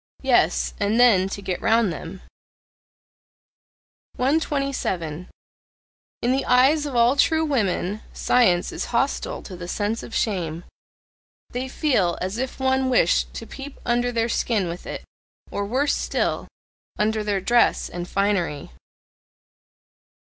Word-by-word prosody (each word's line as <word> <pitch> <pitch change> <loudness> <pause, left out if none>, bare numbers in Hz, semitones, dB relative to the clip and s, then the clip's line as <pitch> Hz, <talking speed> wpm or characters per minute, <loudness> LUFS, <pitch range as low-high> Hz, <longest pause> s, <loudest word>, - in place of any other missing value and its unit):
Yes, - - +2
and 215 +4 +1
then 200 -6 +5
to 200 +1 -6
get 185 -2 -3
round 225 -5 +3
them. 165 +5 -8 1.9
127. 255 - -1 0.9
In 245 - +2
the 265 +1 +1
eyes 280 +4 +4
of 275 - -5
all 240 +3 +4
true 320 +3 +3
women 215 - -1
science 185 -8 +2
is - - -4
hostile 250 +4 -1
to 185 - -9
the 175 0 -7
sense 210 +4 -2
of 225 - -8
shame. 175 -6 -1 0.9
They 250 +2 -3
feel 245 - +1
as 190 +5 -3
if 260 +1 -4
one 265 0 +1
wished 210 -9 +2
to 230 - -6
peep 275 +4 -9
under 245 0 +1
their 230 -1 0
skin 220 -5 0
with 170 +1 -7
it - - -6 0.5
or 200 0 -2
worse 275 +6 +1
still! - - -1 0.5
under 215 0 0
their 205 -2 0
dress 240 +5 +2
and 175 0 -6
finery. 190 - -1
225 Hz, 130 wpm, -23 LUFS, 185-255 Hz, 1.9 s, then